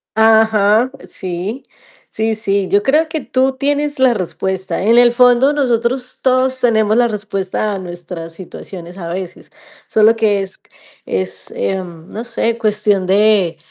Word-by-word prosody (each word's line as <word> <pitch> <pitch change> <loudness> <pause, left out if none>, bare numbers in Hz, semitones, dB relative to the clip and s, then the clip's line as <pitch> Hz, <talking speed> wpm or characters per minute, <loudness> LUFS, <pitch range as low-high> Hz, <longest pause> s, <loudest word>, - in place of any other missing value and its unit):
Ajá, 220 +1 +4 0.2
sí. 185 +7 -5 0.4
Sí, 220 0 -1
sí, 200 -3 -1
yo 200 +2 +2
creo 300 +7 +2
que 315 -1 -3
tú 260 +2 +1
tienes 290 +2 -1
la 260 -2 +4
respuesta. 190 0 -3
En 225 +4 +3
el 240 0 +6
fondo 250 +3 +4
nosotros 255 -2 -1
todos 260 0 +2
tenemos 220 -3 +2
la 240 0 +4
respuesta 210 -1 -3
a - - -3
nuestras 175 -2 -8
situaciones 180 0 -10
a 170 -3 -6
veces. 185 +1 -7 0.4
Solo 220 +1 +4
que 215 -3 +1
es 190 -1 -7 0.5
es, 95 0 -4
eh, 195 - -1
no 175 +5 -9
sé, 230 -1 -1
cuestión 210 -3 +1
de 195 -3 +3
215 Hz, 145 wpm, -16 LUFS, 190-245 Hz, 0.5 s, el